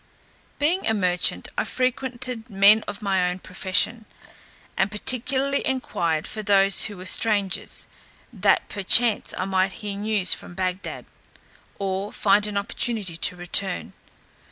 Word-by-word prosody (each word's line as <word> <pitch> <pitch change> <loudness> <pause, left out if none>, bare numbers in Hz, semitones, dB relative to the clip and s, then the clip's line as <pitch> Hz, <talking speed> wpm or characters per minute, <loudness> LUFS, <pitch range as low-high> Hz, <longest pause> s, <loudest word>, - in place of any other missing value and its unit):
Being 330 +7 0
a 220 - +3
merchant, 180 -3 0
I - - +1
frequented 250 -2 -2
men 205 +2 +5
of 205 +1 -6
my 190 -3 +1
own 180 - -4
profession, 190 +5 -1 0.7
and 190 - +1
particularly 260 +6 +1
enquired 170 -11 -1
for 215 - -5
those 195 -1 +3
who 205 -3 -6
were 185 - -9
strangers, 200 0 +1 0.5
that - - +2
perchance 215 +3 +2
I 185 - -1
might 190 0 +1
hear 210 -3 -6
news 210 -3 +1
from 175 - -7
Bagdad, 185 0 -4 0.7
or 195 +1 -3
find 205 +1 +2
an 205 -1 -3
opportunity 200 -2 -2
to 170 - 0
return. 180 +1 0
200 Hz, 130 wpm, -24 LUFS, 185-225 Hz, 0.7 s, men